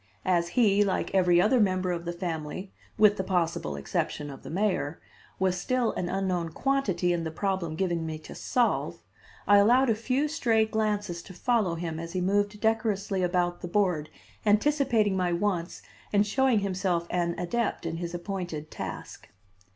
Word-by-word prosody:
As 175 -2 +2
he, 205 -4 +5
like 195 -2 -1
every 180 -2 +4
other 220 +7 +4
member 185 -3 +2
of 170 -1 -3
the 170 - -2
family, 170 +1 -5 0.2
with 210 -1 +5
the 190 - -1
possible 170 - -1
exception 140 - -3
of 135 - -10
the - - -9
mayor, 175 -4 -1 0.4
was 185 -1 +1
still 255 +3 +1
an 175 - -3
unknown 180 -3 -1
quantity 200 -11 +1
in 170 -1 -1
the 160 - -2
problem 180 -1 -2
given 170 -2 -1
me 160 -1 -4
to 155 - -11
solve, 245 -2 0 0.4
I 205 - +6
allowed 240 +5 +5
a - - +4
few 255 +6 0
stray 235 -8 +2
glances 210 -5 -1
to 185 - -12
follow 210 -3 +1
him 165 -1 -4
as 165 +1 -6
he 185 - -1
moved 205 +3 0
decorously 215 -3 0
about 175 -1 0
the - - -4
board 175 -5 0 0.3
anticipating 220 -2 +2
my 180 -2 +1
wants 175 -1 -2 0.3
and 205 0 +3
showing 245 +1 +2
himself 185 -3 -1
an 170 -1 0
adept 205 +2 -2
in 165 0 -3
his 170 0 -4
appointed 175 -4 -5
task. - - -7
185 Hz, 170 wpm, -28 LUFS, 170-210 Hz, 0.4 s, I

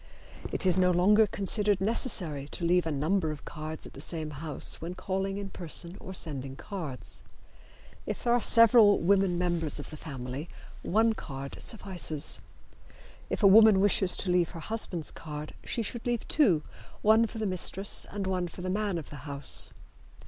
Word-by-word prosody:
It - - 0
is 185 -1 +3
no 180 -1 +4
longer 205 +5 +4
considered 205 0 +1
necessary 180 - +1
to 170 - -7
leave 175 0 +2
a - - -1
number 160 +4 0
of 150 -1 -7
cards 155 0 -5
at - - -11
the 140 - -9
same 155 0 -3
house 150 +1 0
when 170 +2 -6
calling 195 +1 -3
in 200 -1 -6
person 170 +1 -2
or 190 - -9
sending 140 -7 -2
cards. 155 -6 -5 0.9
If - - -4
there 240 - +2
are 240 - +2
several 230 -3 +6
women 190 0 +2
members 170 -4 -1
of 145 - -9
the 155 - -8
family 135 +1 -7 0.3
one 225 +3 +2
card 140 -8 -8
suffices. 180 -8 -3 0.9
If - - -3
a - - +8
woman 215 0 +7
wishes 190 -2 +3
to 185 - -1
leave 180 -2 +2
her 170 - -9
husband's 175 -4 -4
card 150 -1 -8
she 230 - -2
should 235 +3 -5
leave 240 -2 -2
two, 190 - +3 0.4
one 220 +2 +5
for 225 - -10
the 220 - -2
mistress 190 +1 +2
and 200 -1 -4
one 185 -2 -1
for 180 +1 -10
the 185 - -2
man 205 -2 -1
of 160 - -8
the 145 - -8
house. 140 -1 +2
180 Hz, 180 wpm, -28 LUFS, 155-205 Hz, 0.9 s, a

